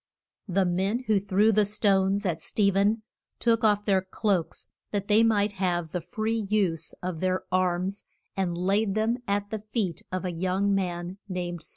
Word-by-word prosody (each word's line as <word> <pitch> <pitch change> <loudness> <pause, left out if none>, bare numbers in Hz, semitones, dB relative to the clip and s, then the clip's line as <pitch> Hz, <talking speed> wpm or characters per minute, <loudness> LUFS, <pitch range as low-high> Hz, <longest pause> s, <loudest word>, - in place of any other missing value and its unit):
The 190 0 +2
men 190 +7 0
who 215 -4 +2
threw 205 +3 +3
the 210 0 +4
stones 200 -1 +2
at 165 -3 -1
Ste 200 +2 +1
phen 205 +3 +2 0.4
took 230 -2 +2
off 205 -1 +3
their 195 -2 +3
cloaks, 190 -2 -2 0.2
that 200 -1 -2
they 210 +1 +5
might 215 -2 +3
have 175 -4 -1
the 180 - -2
free 220 +2 -2
use 180 -7 0
of 180 -3 -3
their 185 +1 0
arms, 185 +1 0 0.3
and 180 -3 -1
laid 195 +3 +1
them 220 +2 +1
at 205 0 -1
the 220 - -2
feet 210 -5 -3
of 185 0 -3
a 180 - -1
young 185 +4 0
man 180 -1 -2
named 175 -2 -3
Saul. - - -8
195 Hz, 180 wpm, -27 LUFS, 180-210 Hz, 0.4 s, they